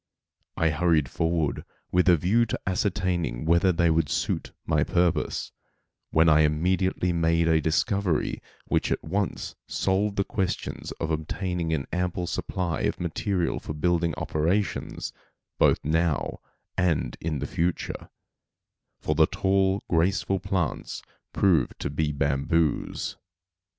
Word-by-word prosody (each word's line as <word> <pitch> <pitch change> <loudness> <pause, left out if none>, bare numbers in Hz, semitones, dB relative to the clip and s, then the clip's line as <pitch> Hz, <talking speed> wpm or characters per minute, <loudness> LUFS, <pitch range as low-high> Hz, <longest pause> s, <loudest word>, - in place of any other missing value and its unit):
I 80 -1 +3
hurried 80 -2 +2
forward 80 +1 -1 0.3
with 90 +1 +4
a 85 - +6
view 110 +9 +2
to - - -3
ascertaining 90 - -1
whether 85 +3 +4
they 85 -1 +2
would 80 -2 +2
suit - - -1
my - - +2
purpose, 90 -1 0 0.6
when 80 +1 +4
I 80 -1 +6
immediately 90 +4 +1
made 85 0 +2
a 80 -1 +4
discovery 90 +2 0 0.2
which - - 0
at - - -1
once 95 +4 -2
solved 100 +2 0
the 100 - +2
question 95 -2 -2 0.2
of 80 - -2
obtaining 85 +2 -2
an 75 -4 -1
ample 90 0 -1
supply 85 0 -2
of - - -1
material 90 +1 -1
for - - -6
building 85 +1 +1
operations, 90 +7 -1 0.5
both - - +5
now 80 0 0 0.4
and 85 -9 +1
in 80 -2 -1
the - - -3
future; 85 +1 -2 0.9
for - - 0
the - - +5
tall, 95 0 +1
graceful 95 +3 +1
plants 95 -4 -2 0.3
proved 85 -10 +2
to - - -3
be 75 +1 0
bamboos. 70 +3 0
85 Hz, 130 wpm, -26 LUFS, 80-95 Hz, 0.9 s, a